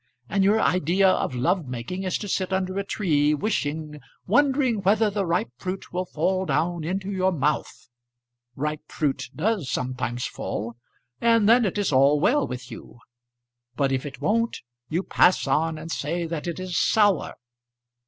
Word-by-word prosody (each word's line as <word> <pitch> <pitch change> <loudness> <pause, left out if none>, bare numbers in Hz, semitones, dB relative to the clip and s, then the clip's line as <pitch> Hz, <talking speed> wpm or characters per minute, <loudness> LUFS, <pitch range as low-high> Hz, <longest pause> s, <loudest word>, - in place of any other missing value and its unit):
And 195 +6 +1
your 205 +3 +4
idea 185 0 +3
of 185 -8 +1
love 135 +6 0
making 125 +10 -5
is 185 - 0
to 205 - -6
sit 190 -1 -1
under 190 0 -1
a - - -1
tree 150 -7 +1
wishing, 150 -4 -2 0.3
wondering 260 -1 +2
whether 210 +2 +3
the 200 -2 -1
ripe 170 -6 0
fruit 185 0 -5
will 180 +1 -1
fall 185 +4 0
down 170 0 0
into 190 +4 -3
your 190 -1 +1
mouth. 150 -3 -2 0.7
Ripe 150 +2 -3
fruit 140 -4 -1
does 190 - -1
sometimes 125 -1 -2
fall, 115 +3 -4 0.5
and 230 -2 +4
then 235 +1 +6
it 195 - -2
is 205 -5 0
all 140 +2 +4
well 280 - +2
with 125 0 -7
you. - - -11 0.8
But 135 +1 +1
if 130 -1 0
it 140 -2 -8
won't, 230 +2 0 0.3
you 170 +4 -1
pass 185 - +3
on 160 +3 +1
and 160 +2 -7
say 170 +4 -2
that 165 0 -4
it 170 +1 -4
is 185 -2 -4
sour. 205 -4 +2
180 Hz, 165 wpm, -25 LUFS, 150-195 Hz, 0.8 s, then